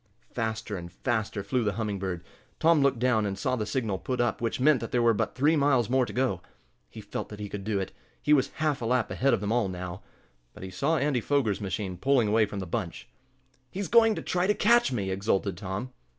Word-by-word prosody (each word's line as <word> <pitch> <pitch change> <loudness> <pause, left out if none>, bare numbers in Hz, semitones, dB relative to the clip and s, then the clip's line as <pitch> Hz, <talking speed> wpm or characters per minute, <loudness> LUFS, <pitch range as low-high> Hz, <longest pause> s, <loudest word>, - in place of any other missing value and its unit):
Faster 110 -2 -3
and 85 -1 -8
faster 110 -1 -2
flew 120 +5 0
the 105 -2 0
Humming 105 -2 -3
Bird. 90 -3 -4 0.4
Tom 165 -2 +4
looked 140 -2 +3
down, 120 -2 +2
and 100 -2 -2
saw 125 +5 0
the 105 -4 -3
signal 105 -4 -1
put 130 -1 -3
up 120 -2 0
which 115 +1 -1
meant 140 0 +4
that 115 - -6
there 125 - +2
were 115 -1 +5
but 100 - -2
three 150 +5 +3
miles 135 -6 +2
more 130 -2 +3
to - - -6
go. 125 -9 0 0.5
He 110 - -10
felt 100 - -5
that 105 - -9
he 105 - -4
could 100 0 -6
do 105 -1 -1
it. 95 - -4 0.3
He 150 - +2
was 135 -3 +4
half 155 -3 -1
a - - -2
lap 125 -1 +1
ahead 135 +2 +2
of - - -6
them 105 +1 -2
all 115 -4 +1
now. 90 0 -6 0.5
But - - -10
he 95 - -6
saw 145 - +1
Andy 140 -3 +1
Foger's 120 -7 0
machine 95 -1 -3
pulling 130 +1 +2
away 110 0 +3
from 100 - -7
the 95 - -4
bunch. 90 -1 -4 0.6
"He's 195 +4 -4
going 225 -2 +5
to - - -5
try 180 +1 0
to 210 - +3
catch 235 - +4
me!" 100 -6 -2
exulted 100 0 0
Tom. 100 +7 -5
115 Hz, 235 wpm, -28 LUFS, 100-130 Hz, 0.6 s, were